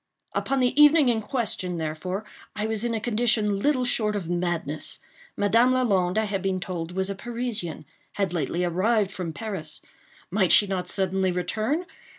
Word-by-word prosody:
Upon 270 -1 0
the 255 +4 +3
evening 295 -2 +7
in 225 -2 +1
question, 210 -7 -2
therefore, 165 +6 -4 0.3
I 210 - -2
was 220 0 -2
in 235 -1 0
a - - -1
condition 215 -2 +1
little 255 +1 +2
short 215 -4 0
of 175 -4 -3
madness. 175 -4 -2 0.4
Madame 230 +5 +4
Lalande, 200 -7 +1
I 220 - +3
had 200 -2 -2
been 190 -1 -1
told, 175 -2 -5
was 190 +1 -1
a - - -1
Parisian—had 205 - -4
lately 175 +1 -1
arrived 195 +4 +1
from 185 -4 -4
Paris—might 185 0 -4
she 210 - +8
not 185 -2 -3
suddenly 190 0 0
return? 215 - -1
200 Hz, 160 wpm, -25 LUFS, 180-230 Hz, 0.4 s, she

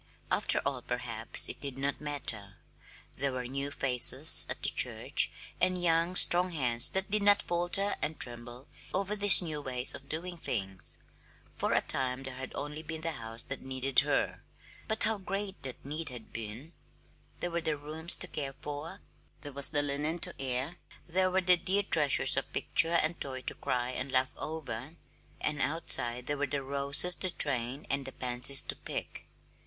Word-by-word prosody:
After - - +3
all, - - -3
perhaps - - 0
it - - -7
did 140 -2 -6
not 140 +2 -4
matter; 115 -9 -3 0.6
there 140 +1 -2
were 125 -1 -6
new 140 +3 -5
faces 135 +2 +7
at - - -6
the - - +7
church, - - +1 0.3
and 185 0 +1
young, 170 +1 0
strong 180 +1 +6
hands 120 -6 +1
that 190 +1 -5
did 210 0 0
not 205 0 +3
falter 175 +4 +1
and 150 0 -4
tremble 120 +1 -2 0.3
over 200 +2 -3
these 205 -2 +6
new 155 -3 -6
ways 125 -2 0
of 140 - -12
doing 175 +3 -6
things. 95 - -6 0.6
For - - -3
a - - +2
time 130 0 -1
there 130 -1 -8
had 130 +1 -8
been - - -11
only 150 +2 -7
the 160 +1 -6
house 115 -5 -4
that 135 - -8
needed 130 0 +3
her - - -1 0.5
but 220 0 -1
how 220 -2 0
great 195 +1 -6
that 130 -1 -9
need 150 +2 -5
had 120 -3 -11
been! 115 +9 -9 0.7
There 175 - -5
were 170 0 -3
the 160 -2 -3
rooms 155 +4 +5
to 180 - -5
care 140 -5 -6
for, 145 +2 -9 0.4
there 145 -2 -10
was 140 0 +5
the 145 -1 +1
linen 145 +3 -2
to - - -2
air, 135 +6 -3 0.3
there 185 +2 0
were 190 +1 -1
the 180 -1 +3
dear 195 +4 -2
treasures 150 -7 +3
of - - -5
picture 165 +1 0
and 165 0 -2
toy 130 -2 -5
to - - -3
cry 125 -2 -4
and 130 +1 -7
laugh 130 0 0
over; 155 -2 -8 0.4
and 150 -2 -3
outside 125 -6 +1
there 145 +1 -4
were 145 - -2
the 140 0 -5
roses 140 +5 +2
to 185 - -1
train 130 -3 +2
and 135 0 -3
the - - -6
pansies 125 +2 +5
to - - -6
pick. - - -7
145 Hz, 180 wpm, -29 LUFS, 130-170 Hz, 0.7 s, faces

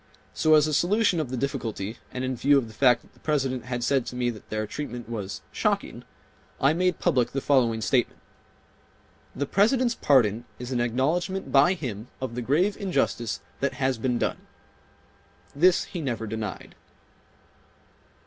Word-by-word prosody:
So 155 0 +4
as 150 -1 +5
a 155 - -2
solution 190 +3 +2
of 150 -5 -2
the 130 - -3
difficulty 115 -5 -3
and 125 - -4
in 130 0 -1
view 140 +4 +4
of 130 -4 0
the 110 - -12
fact 125 +1 +4
that - - -23
the - - -24
President 135 -5 -1
had 120 -1 -3
said 135 +1 +2
to - - -6
me 125 -1 0
that 110 - -13
their 110 0 -2
treatment 125 -1 -6
was 105 -4 -5
"shocking" - - -1 0.6
I 135 +3 +4
made 180 0 +1
public 125 -2 +1
the 135 - 0
following 120 -5 +2
statement: 120 +2 +1 1.2
"The 140 - -1
President's 235 - +2
pardon 120 - +2
is 125 +1 -7
an 120 -2 0
acknowledgment 160 - -1
by 145 +7 +5
him 120 - -6
of 130 -3 -4
the 125 - -3
grave 165 - +2
injustice 120 - -1 0.2
that 140 - 0
has 130 -3 0
been 125 0 0
done:" - - -1 1.2
This 175 +5 +4
he 175 - -6
never 120 -6 -3
denied. 105 -4 -5
130 Hz, 170 wpm, -26 LUFS, 120-155 Hz, 1.2 s, as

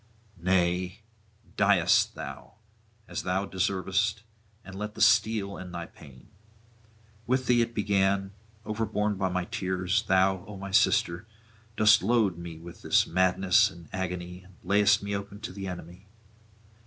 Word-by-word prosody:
Nay 90 +2 0 0.6
die - - +3 0.3
thou, - - -9 0.5
as - - -4
thou 95 +2 -1
deservest, 95 +2 -1 0.4
and 95 - -10
let 105 +2 -6
the - - -10
steel 105 -2 +3
end 90 -1 -8
thy 85 -1 -4
pain. 70 -7 -16 1.0
With 130 +1 +1
thee 120 -1 +3
it 115 0 -2
began; 100 -1 +1 0.3
overborne 105 -1 -1
by 95 -1 -1
my 90 -1 -2
tears, 95 +3 -1
thou, 95 -2 +2
O 105 -2 -8
my 100 0 -7
sister, 85 +1 +2 0.5
dost 105 0 +6
load 100 -5 +1
me 85 -2 -8
with 85 +1 -12
this - - +3
madness 95 +4 +3
and 85 -5 -14
agony, 90 -1 -4
and 90 0 -19
layest 105 +2 +3
me 100 0 -3
open 100 +1 -6
to 105 - -6
the 95 0 -6
enemy. 90 +2 -9
95 Hz, 140 wpm, -28 LUFS, 90-105 Hz, 1.0 s, dost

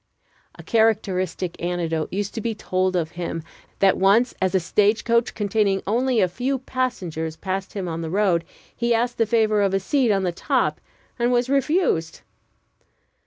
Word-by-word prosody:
A - - -12
characteristic 190 -6 0
anecdote 170 -2 -2
used 200 +1 -3
to 225 - -4
be 225 0 -2
told 185 -2 -1
of 165 -2 -1
him: 170 -2 -4 0.3
that 195 -1 +3
once, 210 +6 +4
as 190 0 +1
a - - +5
stage 205 +5 +2
coach 235 0 +1
containing, 205 -2 +1
only 245 +3 +1
a 185 - +4
few 250 +9 -2
passengers 185 -12 -3
passed 190 +3 -4
him 195 -3 -4
on 165 0 -4
the 165 - -4
road, 185 -2 +2 0.3
he 235 0 +1
asked 240 +1 -1
the 225 - +3
favor 215 -2 +2
of 195 -1 +2
a - - +2
seat 245 +4 +1
on 195 -1 +1
the 180 - 0
top, 170 - 0 0.4
and 240 +1 +2
was 245 +1 +1
refused. 275 - +1
200 Hz, 170 wpm, -23 LUFS, 180-235 Hz, 0.4 s, a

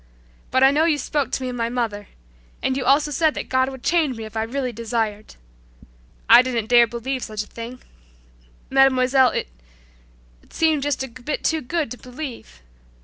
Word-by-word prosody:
But 260 +1 +2
I 270 - +7
know 305 +3 +2
you 315 -3 +2
spoke 290 -1 -2
to 265 - -2
me 255 - -2
of 250 - -5
my 230 -1 -1
mother 225 -5 -3 0.6
and 260 - 0
you 265 - -2
also 290 +3 +3
said 310 +2 +1
that - - -5
God 260 0 +2
would 265 -2 -10
change 315 -8 +1
me 225 - -6
if 220 0 -10
I 220 - 0
really 250 +3 -2
desired. 225 -2 -3 0.9
I - - +9
didn't 245 -4 -2
dare 240 -1 +6
believe 245 +3 -4
such 215 -1 -4
a - - -14
thing, 235 +3 -9 0.9
Mademoiselle 265 -1 +4
it - - -3 1.0
seemed 315 -3 +1
just 285 -2 -1
a - - -5
bit 255 +4 -5
too 320 -1 +1
good 300 0 -2
to 250 - -6
believe. 250 - -9
255 Hz, 185 wpm, -22 LUFS, 235-275 Hz, 1.0 s, I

